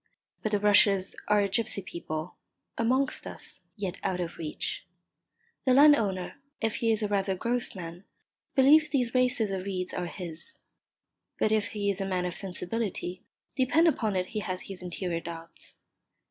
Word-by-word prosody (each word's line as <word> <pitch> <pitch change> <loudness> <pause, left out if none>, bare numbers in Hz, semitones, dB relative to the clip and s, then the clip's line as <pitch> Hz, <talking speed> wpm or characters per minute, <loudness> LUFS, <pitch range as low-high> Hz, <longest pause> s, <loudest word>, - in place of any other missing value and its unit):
But 215 - -1
the 205 - +3
rushes 200 -2 +4
are 210 0 +4
a 200 - +2
gipsy 200 0 0
people, 170 -3 -5 0.4
amongst 255 +4 +1
us, - - -4
yet 195 -3 -4
out 180 -1 -1
of 175 -1 -4
reach. 155 -2 -3 0.8
The 255 -1 +4
landowner, 245 -9 +4 0.2
if 225 0 -1
he 230 -1 +2
is 220 -1 +1
rather 200 -2 +1
a - - -6
gross 240 +3 -1
man, 175 +1 -8 0.5
believes 300 +3 +6
these 250 -5 0
races 250 -5 +3
of 190 -1 -2
reeds 185 -2 -2
are 180 -1 -2
his. 175 - -5 0.8
But 215 - +2
if 215 -2 +2
he 205 -1 -1
is 195 0 -3
a 195 - -1
man 180 -2 0
of 180 - -2
sensibility, 185 -1 -3 0.3
depend 285 +6 +4
upon 220 -10 +1
it 180 -1 +1
he 215 - -2
has 185 -3 -3
his 195 -2 -7
interior 180 -1 -3
doubts. 165 0 -5
200 Hz, 165 wpm, -29 LUFS, 180-230 Hz, 0.8 s, believes